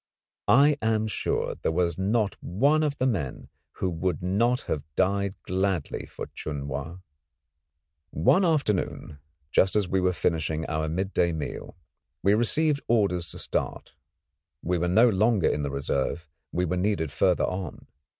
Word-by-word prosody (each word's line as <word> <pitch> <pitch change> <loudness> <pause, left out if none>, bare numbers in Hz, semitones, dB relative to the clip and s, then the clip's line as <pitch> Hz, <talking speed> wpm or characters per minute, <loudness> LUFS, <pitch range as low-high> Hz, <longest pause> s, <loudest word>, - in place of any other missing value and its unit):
I 145 +3 +5
am 110 -1 +1
sure 110 - -1
there - - +1
was 85 -1 +1
not 105 +1 +1
one 140 - +2
of 145 -2 0
the 130 - 0
men 90 - -2 0.2
who 95 - -2
would 90 +2 -2
not 115 +7 +2
have 75 - -3
died 100 +1 +1
gladly 95 -3 -1
for - - -7
Chun 70 -2 -5
Wa. 80 +4 -5 1.1
One 90 - +3
afternoon, 105 - 0 0.3
just 95 +2 +3
as 105 -3 +2
we 95 +1 +1
were 90 0 +3
finishing 80 -2 -1
our 80 0 -2
midday 90 0 0
meal, 80 +2 -6 0.5
we 100 +2 +4
received 140 +7 +2
orders 100 -7 +1
to - - -7
start. - - -3 0.7
We 90 +1 0
were 90 - 0
no 110 +7 +6
longer 110 -2 +3
in 75 - 0
the 70 - -2
reserve; 70 +4 -2 0.2
we 90 +1 0
were 90 +1 -1
needed 90 -5 0
further 90 +3 +2
on. 90 -4 -5
95 Hz, 150 wpm, -26 LUFS, 85-110 Hz, 1.1 s, no